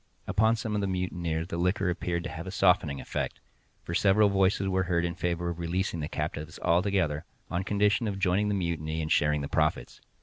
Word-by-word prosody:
Upon 110 +2 +3
some 110 -1 -4
of 105 - 0
the 100 - 0
mutineers 85 -3 -2
the 85 - -3
liquor 90 +2 +1
appeared 85 0 -2
to - - -5
have 85 +3 -7
a - - -3
softening 90 -6 +2
effect, - - -4 0.4
for 85 - -5
several 100 +3 +4
voices 95 0 +2
were 95 0 +1
heard 85 -1 +2
in 85 - -2
favor 85 0 -2
of 85 - -7
releasing 85 +1 -1
the 75 0 -3
captives 75 0 -4
altogether, 85 -4 +1 0.3
on 90 +2 -1
condition 105 +3 +2
of 100 -2 -2
joining 95 +2 +2
the 105 - 0
mutiny 80 -3 -2
and 80 - -4
sharing 75 0 +3
the 70 - -3
profits. 75 -6 -1
90 Hz, 205 wpm, -28 LUFS, 80-95 Hz, 0.4 s, several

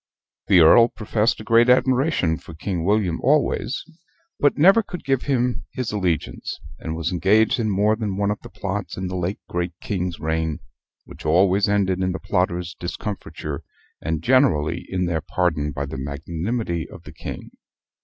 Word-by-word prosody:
The 90 -3 +6
Earl 115 +9 +8
professed 110 -1 0
a - - -7
great 115 +2 +4
admiration 130 - +2
for 80 - -12
King 85 +1 -3
William 100 -3 +1
always, 140 -1 +1 0.6
but 145 - +3
never 195 +9 +6
could 185 -4 -8
give 135 -2 +1
him 125 -3 0
his 125 -3 -3
allegiance; 90 -6 -2 0.2
and 80 0 -4
was 85 +1 -2
engaged 105 +7 +3
in 110 -2 0
more 105 +2 +2
than 105 -4 -3
one 100 0 +1
of 105 - -4
the - - -11
plots 100 0 -4
in 95 - -3
the 90 - -4
late 90 +2 -2
great 90 0 -2
King's 90 -4 -3
reign 80 0 -1 0.5
which - - -12
always 95 +6 +3
ended 95 -2 +1
in 95 -1 0
the 95 - -4
plotters' 90 -2 -1
discomfiture, 80 -5 -5 0.4
and 80 0 -2
generally 120 - +2
in 90 -1 -1
their 85 -2 -1
pardon, 75 -2 0
by 70 0 -3
the 65 -1 -6
magnanimity 85 - -3
of - - -12
the - - -11
King. - - -8
95 Hz, 170 wpm, -23 LUFS, 85-110 Hz, 0.6 s, Earl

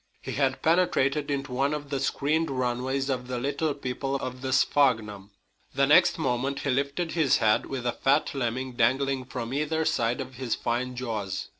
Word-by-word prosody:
He - - -7
had 135 -1 0
penetrated 150 -4 +2
into 140 -1 -2
one 135 +4 +1
of 145 -1 -7
the 140 - 0
screened 150 +4 0
runways 130 +1 -1
of 125 -2 -2
the 125 -1 -3
little 140 +4 -1
people 135 0 -3
of 130 -2 -4
the 130 0 -3
sphagnum. 110 -8 +2 0.5
The - - +4
next - - +5
moment 135 +3 -1
he 140 - 0
lifted 140 +6 -1
his 150 -5 +3
head 110 -2 +2
with 130 -3 -5
a 120 - +2
fat 140 +5 +1
lemming 130 0 -2
dangling 130 +3 +1
from 125 -1 -5
either 155 +3 0
side 120 -2 +1
of 130 -2 -7
his 130 -3 -1
fine 125 +2 -2
jaws. 105 -7 -4
130 Hz, 180 wpm, -27 LUFS, 125-140 Hz, 0.5 s, next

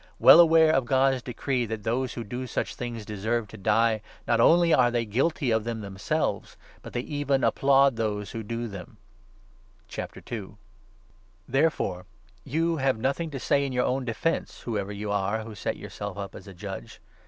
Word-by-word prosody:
Well - - +9
aware 165 -1 +7
32 155 - +4
of 130 - -7
God's 135 0 +2
decree, 125 0 -2
that 110 -1 -5
those 125 +3 -1
who 120 - -4
do 125 +4 -5
such - - -2
things 120 -3 -6
deserve 110 +2 -2
to - - -11
die, 110 +2 +2 0.3
not 115 -1 +3
only 170 +4 +5
are 125 -1 +5
they 120 -1 0
guilty 135 - 0
of 110 -1 +2
them 115 -1 -4
themselves, 100 -2 -2 0.2
but - - -10
they 120 - -1
even 140 -1 -1
applaud 135 -2 +4
those 105 -2 -2
who 115 - -5
do 115 +2 -4
them. 100 -4 -9 2.5
Therefore 135 - 0 0.4
you 165 - 0
have 135 -3 +1
nothing 140 +8 -1
to 140 -3 -5
say 140 +3 +2
in 135 -2 -3
your 125 0 +1
own 130 +1 0
defence, 125 +7 -2
i - - -17
whoever 105 -4 -2
you 105 0 -4
are 100 +2 0
who 110 0 -9
set 100 - -3
yourself 100 -1 -7
up 100 0 -6
as - - -11
a 95 - -9
judge. 95 -8 -8
120 Hz, 180 wpm, -27 LUFS, 105-135 Hz, 2.5 s, Well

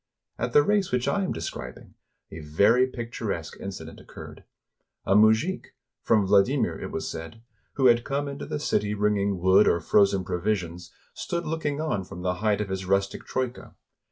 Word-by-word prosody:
At 120 +1 -2
the 145 - +6
race 205 +2 +1
which 125 -1 0
I 200 -1 +1
am 185 - -2
describing, 65 -6 -7 0.4
a 80 - -8
very 100 +12 +3
picturesque 115 -9 -5
incident 95 -1 -8
occurred. - - -12 0.6
A 95 - +2
mujik, 110 - +3
— - - -62
from 110 -3 +2
Vladimir, 100 +8 +3
it - - -6
was - - -4
said, 80 +8 -8
— - - -43
who 135 - 0
had 120 -1 +5
come 140 +1 -2
into 140 +1 -6
the - - -3
city 105 -7 0
bringing 100 -1 +1
wood 95 +3 +4
or 85 - +3
frozen 100 +3 +3
provisions, 90 -1 -3 0.2
stood 170 0 -4
looking 150 -2 -2
on 155 -11 -1
from 90 -1 -9
the 90 -1 0
height 105 -1 +1
of 105 - -4
his 95 0 -4
rustic 100 0 0
troika. 130 -1 -4
105 Hz, 180 wpm, -26 LUFS, 95-130 Hz, 0.6 s, the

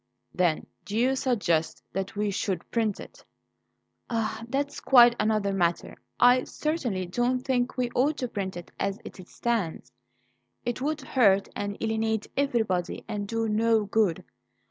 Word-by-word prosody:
"Then 175 -4 +1 0.2
do 205 - -4
you 255 +3 +3
suggest 200 -12 0
that 195 +2 -3
we 205 0 0
should 190 -2 -3
print 220 -4 0
it?" - - -12 0.9
"Ah! 225 -1 -2
that's 285 +2 -2
quite 240 -2 +7
another 215 -2 +1
matter. 175 -3 0 0.2
I 245 +1 +6
certainly 250 - -2
don't 245 +7 0
think 255 -1 -1
we 245 -1 0
ought 285 +4 +2
to 250 - -2
print 195 -5 -4
it 175 - -9
as 195 0 -1
it - - -9
stands; 225 -9 -2 0.7
it 240 +1 -2
would 305 +2 -1
hurt 200 -8 +3
and 205 0 -3
alienate 220 -1 0
everybody 220 -10 0
and 205 -2 -3
do 225 +1 -1
no 220 0 +2
good. 205 -4 +1
220 Hz, 145 wpm, -27 LUFS, 200-245 Hz, 0.9 s, quite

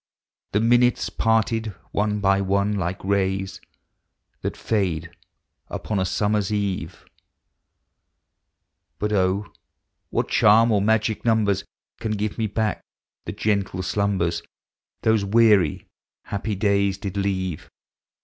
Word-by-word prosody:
The 105 - +3
minutes 120 +2 +3
parting 115 -2 +1 0.2
one 105 0 0
by 100 0 +3
one, 100 +2 +1
like 95 -1 -3
rays 95 0 -1 0.8
That - - -6
lade 95 -8 0 0.6
upon 105 -2 -3
a 95 - +1
summer's 105 +2 0
eve. 95 -5 -3 1.9
1 105 - -1
Jut 95 0 +1 0.4
<>. - - -54
what - - -1
charm 115 +2 +5
or 105 -2 +3
magic 110 +1 +1
numbers 105 -4 +2 0.3
Can 110 -2 -2
give 105 +2 -3
me 110 -2 -1
hack 110 -5 0 0.4
the - - -4
gentle 100 -3 -1
slumbers 90 -3 0 0.6
Those 110 -2 +3
weary, 105 -6 +3 0.4
happy 105 +1 -3
days 100 -1 +1
riiri 100 0 -3
leave? 95 -4 -2
100 Hz, 115 wpm, -23 LUFS, 95-110 Hz, 1.9 s, charm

